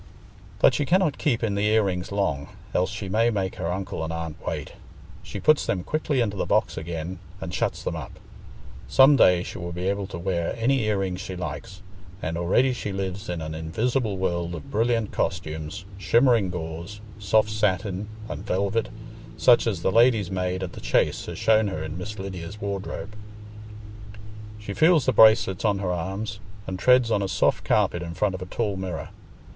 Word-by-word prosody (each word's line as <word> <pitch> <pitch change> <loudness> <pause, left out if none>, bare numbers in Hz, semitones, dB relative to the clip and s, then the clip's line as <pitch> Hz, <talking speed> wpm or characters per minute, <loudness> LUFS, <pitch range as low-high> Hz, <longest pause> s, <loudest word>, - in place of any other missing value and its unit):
But - - +5
she - - +1
cannot 175 -1 +2
keep 120 -6 +1
in 110 -3 +1
the 100 +1 +1
ear 110 0 +4
rings 90 -2 -2
long, 80 -9 -1 0.3
else 90 - +2
she 105 -2 -5
may 110 +5 +2
make 95 -4 -2
her 85 - -2
uncle 95 -2 -3
and 80 - -3
aunt 80 -2 -4
wait. - - -4 0.5
She 100 - -7
puts 155 +8 +3
them 90 -3 -1
quickly 150 -1 0
into 105 -3 -1
the - - -2
box - - +2
again 85 +2 -5 0.2
and 90 - -6
shuts - - -1
them - - -2
up. - - -7 0.7
Some 135 +2 +7
day 90 -8 +5
she - - -7
will 85 -1 -5
be 90 +2 -3
able 100 0 -1
to 95 - -7
wear 85 -1 -1
any 125 +1 +2
ear 105 -1 +1
rings 95 -2 -2
she 95 - -6
likes, 95 +1 -6 0.4
and 80 -3 -3
already 95 +10 +2
she 105 -4 -4
lives 95 +1 -4
in 85 -2 -3
an 80 0 -5
invisible 110 +7 -1
world 85 -2 -1
of 75 - -9
brilliant 115 -1 +1
costumes, 80 +2 -3
shimmering 115 0 +4
gauze, 85 +3 -6 0.2
soft 105 +1 +2
satin, 105 -1 0 0.2
and - - -6
velvet, 100 +4 0 0.5
such 120 -1 +5
as 95 -7 -2
the - - +2
lady's 115 -4 +4
maid 90 0 -1
at 90 - -5
the - - -9
Chase - - +1
has - - -6
shown 110 -1 +3
her 80 -6 -3
in 80 0 -5
Miss 105 +4 -6
Lydia's 95 0 -6
wardrobe. 100 +1 -5 1.4
She 105 -1 -6
feels 160 - +4
the - - +2
bracelets 110 -4 +5
on 105 -3 +2
her 95 -2 -2
arms, 95 +5 -3 0.3
and 95 -1 -5
treads 125 +1 +4
on 105 - +2
a 100 - 0
soft - - +1
carpet 85 - +2
in 85 -1 -6
front 100 +1 +1
of 95 - -6
a 90 - -6
tall 105 +1 -2
mirror. 95 -4 -5
95 Hz, 190 wpm, -25 LUFS, 90-110 Hz, 1.4 s, Some